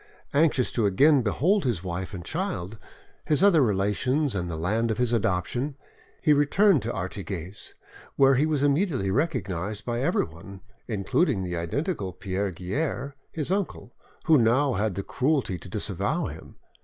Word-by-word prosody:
Anxious 140 -4 +3
to 115 -4 +1
again 140 +9 +5
behold 165 - +1
his 115 -9 -1
wife 90 0 -4
and 90 -4 -7
child, 115 - -4 0.4
his 150 +4 +1
other 185 -6 +6
relations 125 +7 +1
and 90 -3 -2
the 80 - -4
land 110 +8 0
of 110 - -1
his 125 -1 +1
adoption, 115 - -1 0.5
he 150 - +5
returned 150 - +4
to 115 - -3
Artigues, 95 0 -6 0.4
where 135 0 +5
he 140 +4 +2
was 150 -3 0
immediately 145 - +1
recognised 105 - -2
by 120 0 -2
everyone, 95 - -2 0.3
including 105 - +1
the 90 -1 -3
identical 95 - -2
Pierre 95 +3 -2
Guerre, 130 - -3 0.2
his 155 +1 -2
uncle, 195 -10 -2 0.3
who 160 -4 +6
now 125 +4 +3
had 105 -2 -1
the 100 - -3
cruelty 130 - 0
to 95 - -11
disavow 105 - -2
him. - - -9
115 Hz, 155 wpm, -26 LUFS, 95-145 Hz, 0.5 s, other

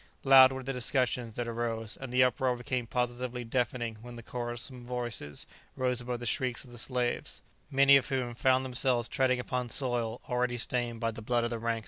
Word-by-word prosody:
Loud 135 -1 +8
were 130 0 -5
the 135 +1 -3
discussions 125 -2 0
that 120 - -3
arose, 115 -2 -2
and 135 -2 -8
the 125 0 +5
uproar 125 0 +1
became 125 0 -3
positively 125 0 -2
deafening 120 -1 -2
when 120 0 -10
the 115 - -9
quarrelsome 120 +1 -5
voices 120 -11 -4 0.3
rose 125 -1 +1
above 120 0 -4
the 120 - -6
shrieks 125 0 -1
of 125 - -15
the 120 - -10
slaves, 125 -1 -2 0.3
many 140 0 +7
of 135 - -2
whom 130 -3 -1
found 130 +2 +2
themselves 125 -2 +1
treading 130 -1 +1
upon 125 0 -2
soil 120 -3 0
already 125 0 0
stained 120 -1 -2
by 115 0 0
the 115 - -9
blood 120 +2 +1
of 120 - -1
the 115 - -3
ranks 115 +1 -2
in - - +3
front. 115 - -4
125 Hz, 205 wpm, -30 LUFS, 120-130 Hz, 0.3 s, Loud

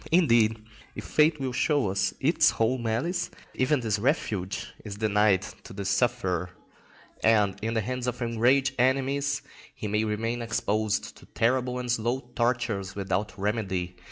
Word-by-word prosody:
Indeed, 115 -10 +3 0.3
if - - -6
fate 150 0 +3
will 130 -2 -2
show 140 -5 +1
its 100 - +2
whole 120 +3 +1
malice, 125 +11 -1 0.2
even 130 +1 +1
this 110 -3 0
refuge 110 - -1
is 105 -2 -6
denied 105 -2 +3 0.2
to - - -11
the 100 0 -5
sufferer, 100 -4 0 0.7
and, 105 -4 +4
in 115 +2 -2
the 110 - +2
hands 125 +3 -3
of 125 0 -2
enraged 125 +3 +2
enemies, 135 +2 +1 0.3
he 105 - -5
may 105 +1 +1
remain 115 +2 -2
exposed 110 -2 -1
to - - -16
terrible 125 +2 0
and 125 -1 -2
slow 120 +2 0
tortures 115 -6 0
without 100 +2 -2
remedy. 95 -4 -2
115 Hz, 145 wpm, -27 LUFS, 105-125 Hz, 0.7 s, and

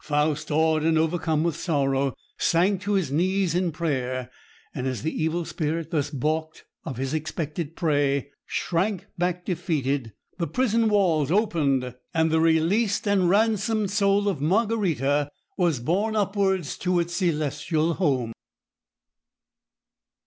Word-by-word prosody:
Faust, 150 0 0
awed 160 +1 +2
and 160 +1 +2
overcome 160 -1 +1
with 170 -3 0
sorrow, 140 -5 0 0.2
sank 185 +3 +2
to 205 +2 -1
his 185 -9 0
knees 185 +3 +1
in 180 -1 +1
prayer, 130 -6 -2 0.4
and 130 -1 -3
as 125 -5 -3
the 160 - -1
Evil 160 +2 -1
Spirit, 160 0 -3
thus 145 -3 0
balked 155 +3 -2 0.2
of 130 - -6
his 135 +2 -2
expected 155 0 -3
prey, 145 -4 +1 0.2
shrank 185 +2 -1
back 180 0 -1
defeated, 145 - -1 0.3
the 170 - 0
prison 230 -3 +1
walls 170 -9 +2
opened, 145 - +1 0.2
and 160 0 +3
the 160 - +3
released 185 +7 +2
and 195 -3 +3
ransomed 215 0 +2
soul 200 0 +2
of 180 -9 -1
Margarita 160 - +1 0.3
was 170 -8 +1
borne 195 - 0
upwards 195 -5 0
to 180 -1 +1
its 170 0 -2
celestial 160 -1 0
home. 130 -10 0
165 Hz, 135 wpm, -25 LUFS, 145-190 Hz, 0.4 s, and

